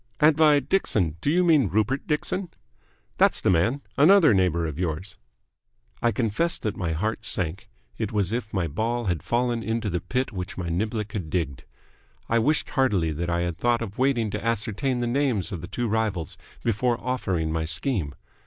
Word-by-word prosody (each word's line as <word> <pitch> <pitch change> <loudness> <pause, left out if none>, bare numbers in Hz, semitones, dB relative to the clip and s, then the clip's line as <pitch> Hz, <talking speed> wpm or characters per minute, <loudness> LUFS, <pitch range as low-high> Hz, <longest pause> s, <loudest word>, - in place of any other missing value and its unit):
"And 150 0 +5
by 150 -2 +5
Dixon 105 - 0
do - - 0
you 180 +4 +3
mean 155 - +4
Rupert 110 +8 0
Dixon?" 180 +4 -1 0.7
"That's - - +4
the - - +2
man. 110 +12 +2 0.2
Another 165 - +6
neighbour 90 -3 +2
of 80 0 -5
yours." 85 +1 -3 0.8
I 120 - +3
confess 125 +10 0
that 105 - -3
my 85 -3 -2
heart 110 +7 -2
sank. 90 -4 0 0.3
It 110 -3 -2
was 100 -4 0
as - - +2
if 110 -3 -7
my 95 -4 0
ball 115 +9 -2
had 90 -5 -1
fallen 120 -1 0
into 110 -1 -2
the 90 - 0
pit 130 +1 -2
which 95 -2 -6
my 90 -2 -3
niblick 105 +4 -2
had 95 -7 -4
digged. 75 -6 -2 0.6
I 115 - +2
wished 150 +7 +1
heartily 105 - +2
that 85 +3 -3
I 85 0 0
had 85 -1 -3
thought 120 +1 +1
of 100 0 -8
waiting 125 -5 +1
to - - -4
ascertain 115 +3 -1
the - - 0
names 120 -6 0
of 90 -5 -5
the 85 - -7
two 120 +5 -2
rivals 105 -8 -1 0.3
before 120 +1 +1
offering 95 -11 -1
my 80 0 -1
scheme. 80 - -1
110 Hz, 190 wpm, -25 LUFS, 90-125 Hz, 0.8 s, Another